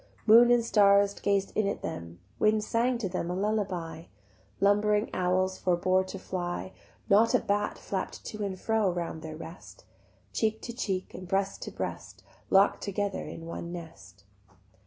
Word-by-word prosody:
Moon 235 +2 +8
and 240 -1 +4
stars 200 -2 +5
gaz'd 200 -1 +1
in 215 -2 +1
at 200 - -3
them, 85 0 -6 0.2
Wind 215 0 +3
sang 235 +3 +1
to 225 -4 -2
them 180 -2 -3
lullaby, 185 -4 -2 0.5
Lumbering 210 +2 +3
owls 185 +1 +1
forbore 185 +1 +2
to 195 - -6
fly, 185 0 -4 0.3
Not 215 +3 +5
a - - +5
bat 205 +1 -1
flapp'd 190 -2 -5
to 215 -1 -5
and 190 -2 -4
fro 220 -2 +1
Round 170 -2 -4
their 155 -1 -7
rest: 165 +2 -11 0.5
Cheek 220 0 0
to 235 - -5
cheek 195 -6 -3
and 185 0 -8
breast 195 +1 -1
to - - -6
breast - - -6 0.3
Lock'd 195 +1 +4
together 200 0 -2
in 165 - -8
one 170 +1 -6
nest. 130 - -10
195 Hz, 155 wpm, -29 LUFS, 180-210 Hz, 0.5 s, Moon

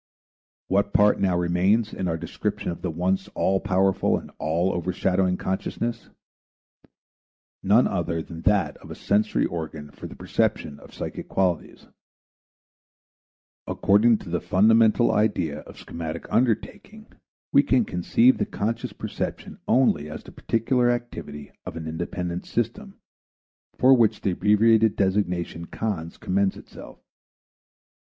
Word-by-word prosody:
What 100 +1 +1
part 105 0 +4
now 95 -3 +1
remains 95 +6 +1
in 95 - -3
our 80 -1 -1
description 80 - -3
of 85 - -8
the 90 - -2
once 90 +4 -1
all 95 0 +1
powerful 95 0 +1
and - - -10
all 85 +4 0
overshadowing 90 +1 0
consciousness? 115 +4 -3 1.5
None 105 +6 +4
other 85 -3 -2
than 80 0 -9
that 105 +1 +1
of - - -15
a - - -7
sensory 105 +1 +1
organ 80 -3 -6
for 70 - -9
the - - -11
perception 70 -1 -1
of - - -15
psychic - - -6
qualities. 90 -4 -1 1.8
According 110 +3 +3
to - - -11
the 85 - -1
fundamental 110 +4 +4
idea 90 -8 0
of - - -13
schematic 80 -2 -6
undertaking 130 - -1 0.5
we 140 - +6
can 130 -4 +2
conceive 115 +8 +3
the - - +1
conscious 115 +3 -3
perception - - -5
only 110 - +2
as 75 - -8
the - - -13
particular 120 +2 +1
activity 85 -12 -5
of - - -7
an 80 -1 -6
independent 85 +2 -4
system 120 - -3 0.8
for 130 +1 +6
which 115 -5 +3
the 95 - 0
abbreviated 105 +3 +3
designation 90 -4 -1
"Cons." 85 -5 -4
commends 95 +1 0
itself. - - -12
95 Hz, 130 wpm, -24 LUFS, 85-110 Hz, 1.8 s, we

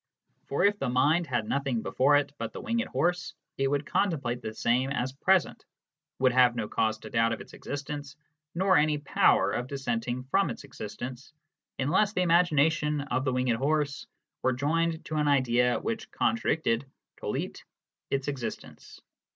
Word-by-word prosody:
For - - +1
if 205 0 +2
the 130 - -1
mind 150 +7 +2
had 120 -5 -1
nothing 135 -5 -1
before 140 +3 +3
it 145 -1 +1
but 115 -1 -4
the - - -6
winged 235 +1 -1
horse 180 +1 -1 0.2
it 135 - +2
would 145 +1 0
contemplate 145 -10 0
the 110 - -4
same 120 +4 +1
as 130 -2 -2
present, 185 +6 +1 0.5
would 130 -1 +3
have 125 -1 +5
no 115 -3 -2
cause 110 0 0
to 110 - -9
doubt 115 0 +2
of 115 - -5
its - - -12
existence, 145 0 -6 0.4
nor 185 +1 +4
any 150 0 +3
power 100 -8 +3
of 125 +4 -2
dissenting 125 -2 -3
from 150 +7 +1
its 120 - -6
existence, 125 +6 -8 0.4
unless 185 +10 +2
the 185 - +1
imagination 155 -3 +3
of 135 -1 -2
the 130 - +1
winged 125 -2 +1
horse 145 +2 -1 0.3
were 130 - +2
joined 160 +5 0
to 155 - -3
an 150 -1 +1
idea 125 -3 +3
which 225 -1 -4
contradicted 155 - 0 0.4
[tollit] - - -4 0.5
its 135 -1 -1
existence." 125 -6 -6
140 Hz, 165 wpm, -28 LUFS, 125-155 Hz, 0.5 s, have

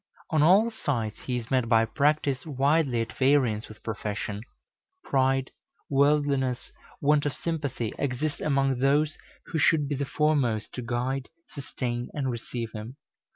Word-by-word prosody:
On 155 -2 +3
all 195 +9 +5
sides 115 - -2
he 125 -1 -3
is 115 -2 -7
met 130 -3 +2
by 115 -1 +5
practice 140 +1 +1
widely 140 -3 +1
at 115 -1 -4
variance 130 -6 +2
with 110 - -13
profession. 105 -2 -4 0.6
Pride, 135 -1 +1 0.4
worldliness, 140 -2 +2 0.3
want 145 0 +3
of 145 - -2
sympathy 145 -9 -3
exist 140 +2 -2
among 135 -3 +1
those 145 +3 +2 0.4
who 165 - 0
should 150 -1 +3
be 145 - -2
the 140 0 -1
foremost 140 -7 +1
to 125 - -5
guide, 125 +3 -2 0.2
sustain, 120 -3 -4
and 135 -3 -1
receive 115 -1 -5
him. 110 +4 -7
135 Hz, 145 wpm, -27 LUFS, 120-145 Hz, 0.6 s, all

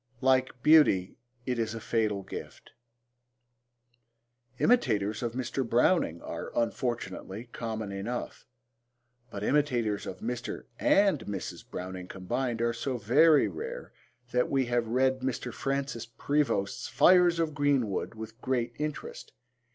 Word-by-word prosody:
Like 130 -1 +2
beauty, 145 - +5 0.3
it 125 -2 -1
is 115 0 -1
a - - -4
fatal 110 -3 0
gift. - - -9 1.9
Imitators 110 - +2
of 120 -2 -2
Mr. 130 +1 -2
Browning 120 - +2
are, - - -6
unfortunately, 115 -2 -3
common 110 -3 -4
enough, 105 +5 -5 0.8
but 100 - -6
imitators 120 -7 +1
of 95 - -5
Mr. 120 +4 -4 0.2
and 195 -6 +4
Mrs. 100 -3 -6
Browning 90 0 -6
combined 115 +6 -2
are 120 0 +1
so 125 +2 -3
very 145 +8 +5
rare 485 +2 -6 0.4
that 125 0 +1
we 135 -1 +2
have 120 -1 0
read 130 +3 +2
Mr. 125 -2 -3
Francis 135 -4 -2
Prevost's 130 -5 -1
Fires 180 -2 +5
of 165 -2 0
Green 145 -5 +2
Wood 100 +3 -3
with 110 +2 -9
great 120 -2 -1
interest. 150 -1 -5
120 Hz, 125 wpm, -29 LUFS, 110-135 Hz, 1.9 s, beauty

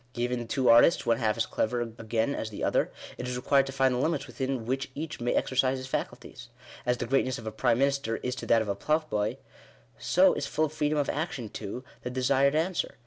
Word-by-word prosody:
Given 120 -1 -2
two 130 +2 0
artists, 120 +9 +6
one 115 -1 +3
half 110 -2 +1
as 115 - +1
clever 120 +2 -1
again 115 +2 -2
as 110 - -4
the 105 - -7
other, - - +1 0.3
it 125 - -4
is 125 - -3
required 135 +2 +2
to - - -4
find 135 -1 +2
the 125 - -1
limits 155 +1 0
within 130 -3 -3
which 135 +3 -2
each 155 -2 -5
may 120 - 0
exercise 130 0 +1
his 130 - -6
faculties. 135 - -5 0.4
As 125 0 +2
the - - -3
greatness 130 0 +1
of 115 - -9
a 110 - -3
prime 110 +1 +1
minister 140 -3 +1
is 125 - -3
to - - -6
that 115 -1 +4
of - - -9
a 100 - 0
ploughboy, 130 -2 -1 0.6
so - - +4
is - - -3
full 155 0 0
freedom 150 0 -1
of 145 -2 +1
action 145 -7 -3
to 120 +7 -6
— - - -28
the - - -4
desired 135 +3 +2
answer. 165 0 -1
125 Hz, 225 wpm, -28 LUFS, 115-140 Hz, 0.6 s, artists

